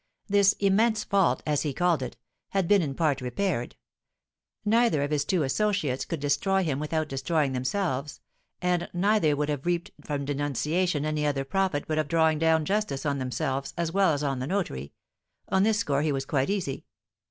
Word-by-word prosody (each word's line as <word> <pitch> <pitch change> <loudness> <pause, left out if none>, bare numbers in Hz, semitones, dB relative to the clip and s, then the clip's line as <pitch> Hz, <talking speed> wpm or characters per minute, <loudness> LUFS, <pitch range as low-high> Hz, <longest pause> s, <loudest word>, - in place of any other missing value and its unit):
This 200 -1 +4
immense 210 +2 +2
fault, 195 -4 +2
as 150 -2 +1
he 145 -4 -2
called 175 -2 +2
it, - - -5 0.3
had 195 -3 0
been 205 0 +5
in 140 -4 -3
part 145 -4 +1
repaired; 125 0 -2 0.9
neither 225 -8 +3
of 145 - -3
his 145 -1 +1
two 165 +2 +1
associates 155 -3 0
could 165 - -4
destroy 145 +8 +1
him 145 -5 -1
without 155 +1 -1
destroying 145 +1 0
themselves, 140 +2 -2 0.4
and 180 -1 0
neither 180 -4 +2
would 145 0 -1
have 145 +2 -3
reaped 175 -1 -1
from 145 -2 -3
denunciation 145 +3 0
any 155 -1 -1
other 140 -2 0
profit 185 -1 0
but 155 0 0
of 155 - 0
drawing 160 0 +2
down 160 -1 +3
justice 200 -8 -1
on 140 -1 0
themselves 135 +1 -3
as 170 -1 -1
well 195 -1 +3
as 145 -1 -1
on 135 -2 -1
the 130 - -3
notary; 145 - -2 0.6
on 190 - +3
this 215 +1 +3
score 145 -9 0
he 155 0 +1
was 135 -1 -2
quite 135 +1 0
easy. 185 -10 -2
155 Hz, 185 wpm, -27 LUFS, 140-190 Hz, 0.9 s, been